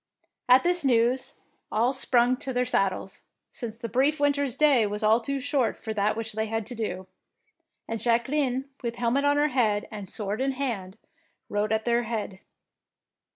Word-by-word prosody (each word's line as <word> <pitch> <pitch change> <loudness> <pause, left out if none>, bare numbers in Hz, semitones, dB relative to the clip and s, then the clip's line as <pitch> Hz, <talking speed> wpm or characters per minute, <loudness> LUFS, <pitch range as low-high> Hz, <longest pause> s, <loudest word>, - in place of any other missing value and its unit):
At 255 +1 +7
this 355 -1 +1
news 245 0 +2 0.3
all 235 +5 +2
sprung 250 -1 +2
to 265 - -5
their 250 0 +1
sad 195 -6 +2
dles, 190 +1 -8 0.3
since 225 -3 -6
the 230 0 -5
brief 270 +6 +2
winter^s 285 -3 +1
day 275 -8 +4
was 210 +2 -4
all 220 +2 +5
too 275 +4 -3
short 270 -2 0
for 220 - -5
that 210 0 +1
which 225 -1 -4
they 220 +1 -2
had 225 0 -2
to 245 - -5
do, 200 -5 -4 0.8
and 225 0 -3
Jacqueline 255 +3 +1
with 235 -1 -3
helmet 245 +4 +1
on 285 0 +3
head 220 -6 +1
and 205 -4 -7
sword 210 +1 -3
in 270 0 +1
hand, 225 -8 -4 0.5
rode 205 +1 -1
at 220 0 0
their 235 0 +2
head. 215 -4 -4
235 Hz, 175 wpm, -26 LUFS, 215-265 Hz, 0.8 s, At